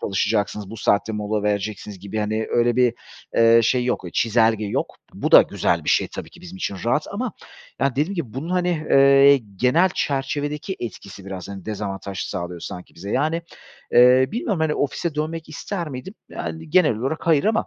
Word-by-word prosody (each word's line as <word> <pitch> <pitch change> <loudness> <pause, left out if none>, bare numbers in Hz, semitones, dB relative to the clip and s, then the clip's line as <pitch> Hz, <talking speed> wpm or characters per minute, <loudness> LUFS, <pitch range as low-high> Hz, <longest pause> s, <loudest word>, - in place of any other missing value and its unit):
çalışacaksınız, 100 0 -1
bu 115 - -7
saatte 105 0 +1
mola 105 0 -2
vereceksiniz 105 -1 -3
gibi, 100 +3 -5
hani, 110 +1 -1
öyle, 120 0 +2
bir, 125 -2 +3 0.4
eee, 115 0 +6
şey 125 +2 +2
yok, 125 -6 -1
çizelge 110 -1 +2
yok. - - -3 0.2
Bu - - -3
da - - +10
güzel - - -1
bir - - -4
şey, - - +3
tabii - - -8
ki - - -16
bizim 90 +1 -10
için 100 - -3
rahat 120 +6 +1
ama 225 +2 -3 0.5
yani, 140 - +3
dediğim 150 +9 -1
gibi 140 - -5
bunun, 150 +6 -5
hani, 180 -3 0
eee, 140 +1 +7 0.2
genel 155 - +3
çerçevedeki 145 +5 -2
etkisi 100 -3 -8
biraz, 95 -1 -7
hani, 95 -2 -8
dezavantaj 100 -2 -5
sağlıyor 90 -2 -4
sanki 90 - -8
bize. 100 +4 -8
Yani, 160 +5 0 0.5
eee, 125 +2 +6
bilmiyorum, 210 -6 -2
hani, 155 -1 +1
ofise 145 +3 -2
dönmek 155 +2 -3
ister 170 +2 -5
miydim? 135 +8 -8
Yani, 160 -1 -6
genel 170 -9 +4
olarak 135 +10 -3
hayır 155 -4 +4
ama 220 +1 +1
125 Hz, 180 wpm, -22 LUFS, 105-155 Hz, 0.5 s, da